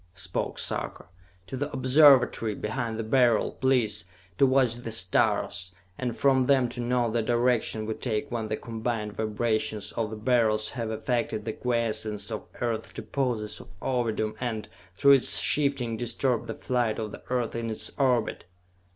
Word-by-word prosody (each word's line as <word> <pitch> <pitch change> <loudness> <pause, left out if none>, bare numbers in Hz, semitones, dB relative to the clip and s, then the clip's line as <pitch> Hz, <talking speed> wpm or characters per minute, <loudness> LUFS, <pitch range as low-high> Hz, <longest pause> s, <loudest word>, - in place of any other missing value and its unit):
spoke 95 -2 -2
Sarka. - - -3 0.4
"To 130 - -6
the 145 +3 -3
Observatory, 130 -5 +5
behind 115 +1 -3
the 115 - -2
Beryl, 120 -1 +3
please, 115 -7 +1 0.3
to 135 - +6
watch 130 -3 +3
the 120 -2 -6
stars, 90 -2 +1 0.2
and 125 -3 -3
from 135 -2 +3
them 130 -2 +4
to 120 - -7
note 120 -1 0
the 120 - +2
direction 120 -1 +1
we 110 - -2
take 110 -2 -2
when 115 -2 -2
the 110 0 -2
combined 115 -2 -3
vibrations 110 -1 -1
of 115 -2 -2
the 110 - -6
Beryls 110 -2 +1
have 115 -3 -4
affected 110 -1 -2
the 110 - -2
quiescence 115 -3 -1
of - - -5
Earth's 115 -2 -2
deposits 115 -6 -2
of 95 - -13
Ovidum 115 -3 -1
and, 110 -4 -3 0.3
through 140 +7 +5
its 135 -2 +5
shifting, 140 -6 0
disturbed 120 +1 -1
the 110 - -4
flight 120 -3 0
of 110 -2 -4
the - - -9
Earth 125 -2 -1
in 115 0 -3
its 110 - -2
orbit!" 125 -8 +1
115 Hz, 160 wpm, -27 LUFS, 110-125 Hz, 0.4 s, to